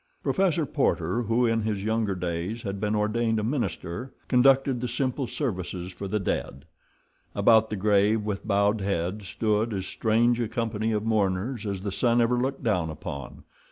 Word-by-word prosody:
Professor 175 -5 +1
Porter, 115 - 0
who 115 +2 +1
in 115 -1 +2
his 105 -2 -2
younger 110 -3 0
days 90 +5 -3
had 100 -1 -4
been 105 +1 0
ordained 110 +2 +1
a - - -2
minister, 115 - -3 0.2
conducted 130 0 +4
the 125 - -1
simple 130 +2 -1
services 95 - -3
for 100 +2 -6
the 105 +2 -1
dead. 70 -7 -3 0.7
About 110 -1 +5
the 105 - -2
grave, 105 +2 +2
with 105 0 -4
bowed 100 +1 +2
heads, 95 +1 -2
stood 105 +2 0
as 95 -1 -3
strange 115 +4 +2
a 120 - 0
company 110 -1 -2
of 105 -1 0
mourners 105 +2 0
as 100 -2 -3
the 100 0 -3
sun 120 +4 +2
ever 120 +1 +2
looked 135 +2 -2
down 90 -8 +1
upon. 70 -3 -7
110 Hz, 170 wpm, -26 LUFS, 100-120 Hz, 0.7 s, About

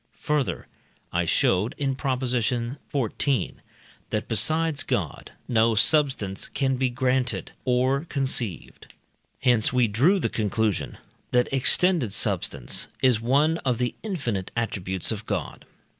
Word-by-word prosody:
Further, 150 -3 -1 0.5
I - - +1
showed 95 +5 +1
(in 135 -2 0
Prop. 130 -1 -2
xiv.), 125 0 -1 0.6
that 105 - -2
besides 155 +7 +2
God - - -3 0.2
no 115 -1 +3
substance 130 -6 +2
can 135 -1 0
be 130 0 +1
granted 125 0 0
or 130 +4 +1
conceived. 130 - -3 0.5
Hence 120 -4 +3
we 125 -2 +3
drew 135 - +3
the - - 0
conclusion 110 -1 -1 0.3
that 125 +2 +1
extended 135 - +3
substance - - 0 0.2
is 125 -4 +4
one 145 +7 +2
of 125 -3 -1
the 125 0 -1
infinite 125 - -3
attributes 95 -5 -2
of 110 0 -5
God. 95 -8 -4
125 Hz, 120 wpm, -25 LUFS, 110-140 Hz, 0.6 s, is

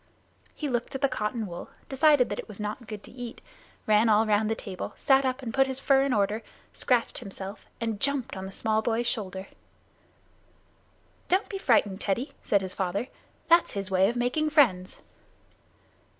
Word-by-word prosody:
He 300 - -3
looked 245 -1 -2
at 270 - -3
the 275 - +4
cotton 220 -2 -2
wool, 175 -3 -7 0.2
decided 280 -1 +4
that 205 - -3
it - - -6
was 210 -2 -11
not 210 +3 -5
good 210 -2 -7
to - - -11
eat, 245 -1 -8 0.5
ran 215 +1 +4
all 215 +1 +5
round 215 0 +2
the 225 - +1
table, 190 -4 -6
sat 270 0 +4
up 260 +1 -1
and 230 -2 -4
put 270 0 +4
his 265 0 -3
fur 270 0 +4
in 275 0 +1
order, 210 0 +1 0.3
scratched 245 -3 +1
himself, 200 -2 -8
and 225 -3 -2
jumped 275 -1 0
on 190 0 -5
the - - -8
small 220 +2 0
boy's 230 +1 0
shoulder. 195 -5 -3 1.8
"Don't 375 +3 +1
be 390 - -4
frightened, 210 - +2
Teddy," 235 +8 -1
said 200 - +2
his 190 -1 -5
father. 195 +6 -2 0.4
"That's 340 +1 +5
his 195 -1 -4
way 190 +1 +4
of 235 - -3
making 250 +6 +1
friends." 220 - +2
225 Hz, 180 wpm, -27 LUFS, 205-265 Hz, 1.8 s, all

